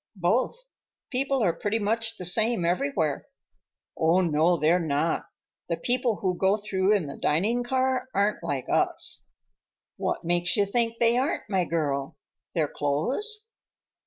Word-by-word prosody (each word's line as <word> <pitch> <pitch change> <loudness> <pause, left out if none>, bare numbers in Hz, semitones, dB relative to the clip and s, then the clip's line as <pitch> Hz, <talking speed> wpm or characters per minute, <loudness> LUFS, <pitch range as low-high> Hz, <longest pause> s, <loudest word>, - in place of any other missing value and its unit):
"Both. 240 - 0 0.5
People 270 -1 +1
are 175 -4 +3
pretty 205 +6 -1
much 225 +1 -1
the 180 - -6
same 220 +1 +1
everywhere." 175 - 0 0.7
"Oh, 165 +3 +3
no, 165 +1 +3
they're 160 +4 +3
not. 160 0 0 0.4
The 170 - 0
people 245 +4 +1
who 185 -2 -1
go 195 +2 +3
through 205 -1 +1
in 190 -6 0
the 140 - -7
dining 215 +11 +1
car 260 0 0
aren't 205 0 0
like 135 -3 -2
us." - - -1 0.7
"What - - -2
makes 175 +2 +1
you 205 - +4
think 230 +3 0
they 235 +1 +4
aren't, 280 +6 -1
my 185 -2 +2
girl? 145 -5 -2 0.4
Their 160 -3 +2
clothes?" 265 - -1
195 Hz, 145 wpm, -26 LUFS, 165-240 Hz, 0.7 s, you